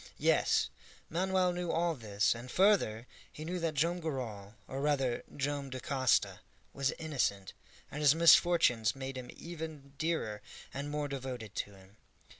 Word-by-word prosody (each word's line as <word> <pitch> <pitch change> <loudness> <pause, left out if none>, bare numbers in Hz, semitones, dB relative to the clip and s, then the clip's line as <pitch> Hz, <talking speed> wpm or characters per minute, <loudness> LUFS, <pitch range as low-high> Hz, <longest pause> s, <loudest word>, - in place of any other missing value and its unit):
Yes, - - +2 0.4
Manoel 185 +1 +2
knew 175 -1 -3
all 170 0 +1
this, 110 -6 +1
and, 120 +2 -9
further, 185 - +3 0.3
he 155 - -8
knew 180 +2 -3
that 165 -2 -1
Joam 170 +5 +1
Garral 115 - -5
or 135 +1 -4
rather 135 -4 +1
Joam 140 0 -2
Dacosta 130 0 +1 0.3
was 135 -1 0
innocent, 125 - -2 0.4
and 150 - -5
his 150 0 +6
misfortunes 165 -9 +5
made 135 0 -5
him 130 -1 -7
even 160 -5 -8
dearer 155 -10 -1 0.3
and 140 +2 -4
more 150 0 -2
devoted 130 -6 -6
to 100 - -4
him. 95 +2 -18
140 Hz, 145 wpm, -32 LUFS, 120-165 Hz, 0.4 s, his